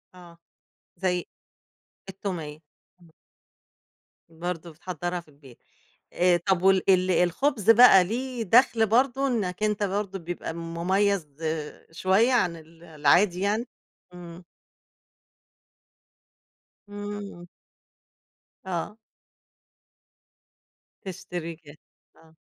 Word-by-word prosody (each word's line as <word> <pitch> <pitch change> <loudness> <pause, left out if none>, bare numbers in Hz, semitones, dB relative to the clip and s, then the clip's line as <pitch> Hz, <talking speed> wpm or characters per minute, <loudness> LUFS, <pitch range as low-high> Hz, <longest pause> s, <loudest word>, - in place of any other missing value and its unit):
آه، 175 -2 -15 0.6
زي 180 -1 -1 0.8
التوميّة، 175 -6 -6 0.4
امم. 170 -2 -20 1.2
برضه 170 0 -6
بتحضّرها 175 +2 -5
في 170 - -15
البيت. 140 -4 -18 0.5
آآ، 180 -1 +3
طَب 175 +1 0
وال 190 0 +3
ال 185 -1 +4
الخُبز 210 - +1
بقى 225 -5 +8
ليه 245 +4 -4
دخل 225 +1 +4
برضه 260 +4 +2
إنك 210 -5 -2
أنت 210 -1 0
برضه 195 -1 -2
بيبقى 170 -1 -6
مميّز 170 +2 -1 0.6
شوية 195 +9 +2
عن 175 -8 +2
ال 165 +1 -16
العادي 170 +4 +2
يعني، 215 +5 0 0.5
إمم. 175 0 -11 2.5
إمم. 205 -3 -7 1.2
آه. 190 +4 -4 2.1
تشتري 175 -3 -6
جاهز، 145 +1 -14 0.4
آه. 160 0 -22
180 Hz, 90 wpm, -26 LUFS, 170-205 Hz, 2.5 s, بقى